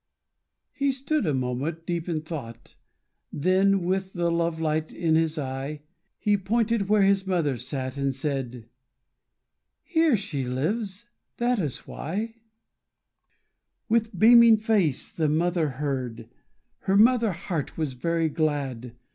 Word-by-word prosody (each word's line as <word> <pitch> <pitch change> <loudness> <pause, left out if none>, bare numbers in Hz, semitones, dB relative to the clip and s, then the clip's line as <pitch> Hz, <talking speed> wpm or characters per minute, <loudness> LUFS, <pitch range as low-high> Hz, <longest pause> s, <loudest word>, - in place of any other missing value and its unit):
He 280 -1 +1
stood 275 - -1
a 150 - +1
moment 135 +6 -3
deep 170 0 -3
in 160 -2 -1
thought, 140 -8 -8 0.6
Then, 190 +4 +2
with 190 +1 -1
the 170 -1 0
love 170 -1 0
light 155 0 -1
in 165 -2 0
his 160 0 +2
eye, 140 +1 -4 0.3
He 210 -1 +2
pointed 220 +1 0
where 210 -1 +4
his 195 0 +2
mother 165 -7 +1
sat, 130 +2 -4
And 135 -1 0
said: 130 -5 -4 1.2
"Here 320 - +3
she 165 -9 -3
lives; 190 - -2 0.3
that 240 -1 +1
is 150 -8 -3
why 215 +9 -5 0.7
'" - - -50
With 225 -3 +1
beaming 230 +2 +8
face 210 - 0
the 155 -2 0
mother 165 0 +1
heard, 130 -4 -4 0.5
Her 195 +1 +1
mother 230 0 +5
heart 165 -3 -4
was 155 -5 -2
very 165 +5 0
glad. 140 -6 -2
165 Hz, 130 wpm, -26 LUFS, 140-205 Hz, 1.2 s, beaming